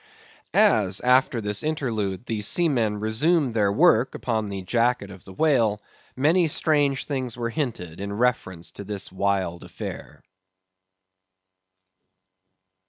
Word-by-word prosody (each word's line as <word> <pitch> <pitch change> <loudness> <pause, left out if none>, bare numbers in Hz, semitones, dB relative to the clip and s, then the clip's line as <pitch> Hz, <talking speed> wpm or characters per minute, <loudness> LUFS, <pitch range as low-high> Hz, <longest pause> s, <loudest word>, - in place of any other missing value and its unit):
As, 95 -2 +4
after 125 -1 +3
this 105 -1 -1
interlude, 115 - -2
the 110 -3 -3
seamen 115 -5 +1
resumed 125 +6 +1
their 105 -3 +2
work 115 +4 +3
upon 110 -3 -2
the 100 -1 -5
jacket 115 0 0
of 95 -2 -13
the 95 - -11
whale, 115 -6 +2 0.4
many 160 +6 +3
strange 145 -3 +1
things 130 -5 -3
were 115 -1 -3
hinted 105 - -4
in 100 0 -4
reference 105 -7 -1
to - - -9
this 100 -1 -4
wild 95 -2 -1
affair. - - -8
110 Hz, 120 wpm, -24 LUFS, 100-130 Hz, 0.4 s, As